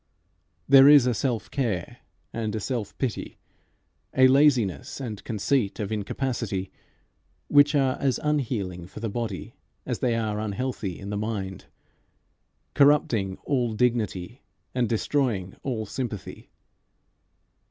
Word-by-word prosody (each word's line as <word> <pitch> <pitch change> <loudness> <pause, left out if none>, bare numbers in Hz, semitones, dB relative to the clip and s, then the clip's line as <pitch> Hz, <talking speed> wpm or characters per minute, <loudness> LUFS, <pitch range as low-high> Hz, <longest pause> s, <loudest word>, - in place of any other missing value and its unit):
There 135 0 +8
is 145 -3 +8
a 125 - +2
self 120 -2 -2
care 110 - -2 0.4
and 110 -2 -2
a - - -1
self 115 -2 -4
pity, 125 -7 -3 0.8
a 130 0 +8
laziness 130 - +2
and 110 -6 -6
conceit 110 0 0
of 105 -1 -3
incapacity, 105 -3 -3 0.8
which 145 +1 +5
are 135 -2 +2
as 135 -2 +1
unhealing 110 - -1
for 100 - -10
the 110 -1 -3
body 110 -4 -4 0.3
as - - -3
they 120 -2 +1
are 110 -2 -1
unhealthy 110 -3 -3
in 100 +1 -6
the 105 - -2
mind, 100 -3 -4 1.1
corrupting 120 -9 +3
all 125 -5 0
dignity 115 -2 -1 0.3
and 125 -3 0
destroying 115 -5 0
all 115 -5 -3
sympathy. 110 -3 -6
115 Hz, 120 wpm, -26 LUFS, 100-130 Hz, 1.1 s, There